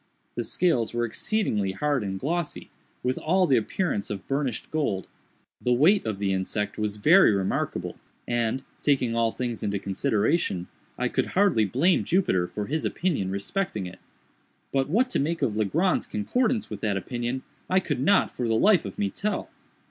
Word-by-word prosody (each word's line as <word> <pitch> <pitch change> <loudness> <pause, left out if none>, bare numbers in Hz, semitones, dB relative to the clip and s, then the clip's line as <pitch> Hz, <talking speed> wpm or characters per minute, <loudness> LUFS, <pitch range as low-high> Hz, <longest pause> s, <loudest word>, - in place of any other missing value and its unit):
The 120 - -2
scales 120 -3 +1
were 120 0 +1
exceedingly 110 - -1
hard 145 +4 0
and 95 -1 -3
glossy, 170 - -3 0.3
with 125 +1 0
all 185 +3 +2
the 135 - +3
appearance 115 - -1
of 100 -2 -6
burnished 135 -4 -2
gold. 110 -12 -1 0.5
The 125 - +2
weight 160 - +4
of 110 -3 -2
the 100 -1 0
insect 105 +3 -2
was 105 -1 -1
very 165 - +6
remarkable, 95 -1 -2 0.3
and, 120 +2 0 0.2
taking 130 -5 +2
all 115 -1 +2
things 120 -2 -3
into 100 -1 -1
consideration, 100 - 0 0.3
I - - 0
could - - 0
hardly 190 - +4
blame 140 - +2
Jupiter 95 - +1
for 105 +2 -4
his 155 +6 -2
opinion 155 - -1
respecting 100 - -2
it; 90 - -9 0.7
but 135 0 +1
what 235 +10 +3
to - - +1
make 155 +2 -1
of 115 -6 +1
Legrand's 155 - +1
concordance 225 - 0
with 105 -2 -6
that 105 -3 0
opinion, 120 +5 -3 0.3
I 185 - +4
could 145 -8 -2
not, 195 +10 +3
for 125 - -3
the 115 - +2
life 195 - +4
of 100 - -7
me, 100 -1 0
tell. 210 - -3
120 Hz, 170 wpm, -26 LUFS, 105-165 Hz, 0.7 s, very